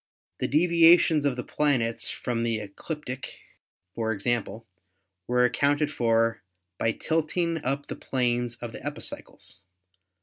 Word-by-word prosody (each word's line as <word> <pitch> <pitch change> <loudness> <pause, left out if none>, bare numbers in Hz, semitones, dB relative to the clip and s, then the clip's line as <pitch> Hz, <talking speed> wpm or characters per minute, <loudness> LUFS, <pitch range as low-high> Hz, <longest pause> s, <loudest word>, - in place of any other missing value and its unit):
The - - 0
deviations 165 -1 +5
of 140 -3 +1
the 125 - -4
planets 125 -6 0
from 120 -2 -3
the 115 -1 0
ecliptic, 130 +6 -6 0.6
for 110 -1 -1
example, 115 +1 -2 0.6
were 125 0 +3
accounted 145 +4 +1
for 115 -3 +1 0.4
by 115 - +2
tilting 165 0 -1
up 140 +2 -1
the - - -6
planes 120 -2 -1
of 120 -1 -7
the - - -10
epicycles. 100 - -7
125 Hz, 125 wpm, -27 LUFS, 115-150 Hz, 0.6 s, deviations